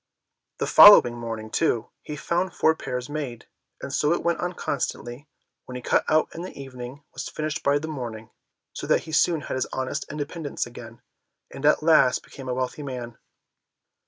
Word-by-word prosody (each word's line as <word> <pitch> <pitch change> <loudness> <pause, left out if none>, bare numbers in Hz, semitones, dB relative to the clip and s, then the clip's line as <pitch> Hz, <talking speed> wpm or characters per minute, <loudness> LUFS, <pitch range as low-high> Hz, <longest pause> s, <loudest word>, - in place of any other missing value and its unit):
The - - -1
following 205 -13 +9
morning, 115 -2 -6
too, 120 -8 0
he 150 - -7
found 170 +5 -1
the - - -22
four 160 - +4
pairs 125 -5 -5
made; 145 -6 -5 0.4
and 140 - -5
so 150 +2 +2
it - - -2
went 170 -1 0
on 180 0 -2
constantly, 140 -3 -4 0.4
what 125 - -9
he 125 - -6
cut - - +2
out 155 0 +3
in 165 - -6
the 180 -5 -8
evening 130 +1 -9
was - - -5
finished 155 -1 -3
by 140 +1 +3
the 155 +2 -4
morning, 115 -7 -6 0.4
so - - -6
that - - +3
he 160 - -10
soon 165 0 +2
had - - -5
his 130 - -1
honest 130 +2 -3
independence 150 0 -4
again, 120 -1 -12 0.5
and 135 +2 -1
at 150 - +4
last 155 -5 +4
became 135 -2 -10
a - - 0
wealthy 130 +3 -3
man. 125 -4 -7
140 Hz, 190 wpm, -25 LUFS, 125-155 Hz, 0.5 s, following